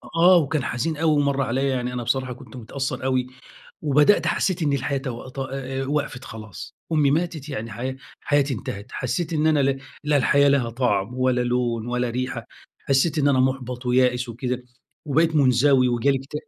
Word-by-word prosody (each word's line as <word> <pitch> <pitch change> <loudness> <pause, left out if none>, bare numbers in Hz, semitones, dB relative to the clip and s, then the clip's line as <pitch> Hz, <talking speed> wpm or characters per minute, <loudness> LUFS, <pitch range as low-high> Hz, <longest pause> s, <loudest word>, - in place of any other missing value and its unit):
آه، 175 +2 +7
وكان 155 -3 0
حزين 150 +6 -2
أوي 160 +1 +2
ومَرّ 140 -1 +1
عليَّ 135 +1 0
يعني 125 -1 -2
أنا 125 -1 -3
بصراحة 130 +2 -1
كنت 125 - -13
متأثّر 130 +3 -4
أوي 130 -1 0 0.6
وبدأت 150 +6 +4
حسّيت 185 -4 0
إني 145 -2 +2
الحياة 140 +1 -1
تو 130 -2 -6
ت 130 - -12
أ 135 0 -4
وقفِت 140 -3 -2
خلاص، 110 -4 -9 0.2
أمي 150 -3 +3
ماتت 155 -1 -1
يعني 115 -5 -5
حيا 130 +5 -4 0.2
حياتي 145 -2 +1
انتهت. 100 -1 -6
حسّيت 155 +7 -2
إن 155 -1 +1
أنا 155 -2 +3
ل 135 0 0 0.2
لا 150 0 +2
الحياة 140 +1 +4
لها 135 -4 +2
طَعم 115 -3 0
ولا 130 -1 +2
لون 120 -2 -1
ولا 125 0 -1
ريحة، 130 +2 -3 0.4
حسّيت 140 +4 +2
إن 145 -1 +3
أنا 130 -2 +3
مُحبَط 130 -1 -1
ويائس 125 0 +2
وكده 125 +2 -4 0.4
وبقيت 160 +2 +2
منزوي 130 -1 +4
وجالي 130 +3 +2
إكت 135 +2 -13
130 Hz, 180 wpm, -23 LUFS, 125-145 Hz, 0.6 s, آه